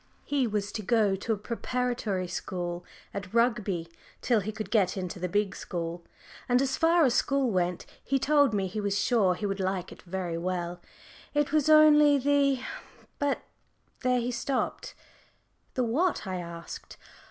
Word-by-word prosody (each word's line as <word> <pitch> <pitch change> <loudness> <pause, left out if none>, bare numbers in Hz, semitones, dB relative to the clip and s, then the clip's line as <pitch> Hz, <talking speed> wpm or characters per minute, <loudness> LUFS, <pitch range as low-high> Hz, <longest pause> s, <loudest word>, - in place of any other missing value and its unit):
He 275 -4 +1
was 205 -1 -2
to 215 - -4
go 210 -2 +2
to 200 +4 -3
a - - -2
preparatory 235 -3 -2
school 175 -1 -4 0.3
at 200 +1 -6
Rugby 215 -8 +1 0.4
till 235 -3 +3
he 210 +2 -3
could 215 0 -6
get 205 -4 +2
into 185 0 -4
the 180 0 -2
big 205 0 0
school. 170 -1 -5 0.5
And 245 0 +4
as 270 0 +1
far 330 0 +4
as 250 - +3
school 275 -2 +2
went, 180 -2 0 0.2
he 275 - +1
told 285 0 +4
me 200 -3 0
he 200 +3 -3
was 200 -1 0
sure 205 -7 +3
he 210 - -4
would 195 0 -2
like 190 -1 -2
it - - -12
very 175 -2 -4
well, 175 0 -3 0.5
it 295 -1 +2
was 310 -1 +3
only 300 -1 +7
the 280 -1 +2 0.6
but 285 -1 0 0.6
there 250 -1 +2
he 240 +1 -1
stopped. 260 +2 -2 0.8
"The 255 - +1
what?" 290 +6 +1
I 185 -2 -3
asked. 170 -1 -8
215 Hz, 165 wpm, -28 LUFS, 185-260 Hz, 0.8 s, only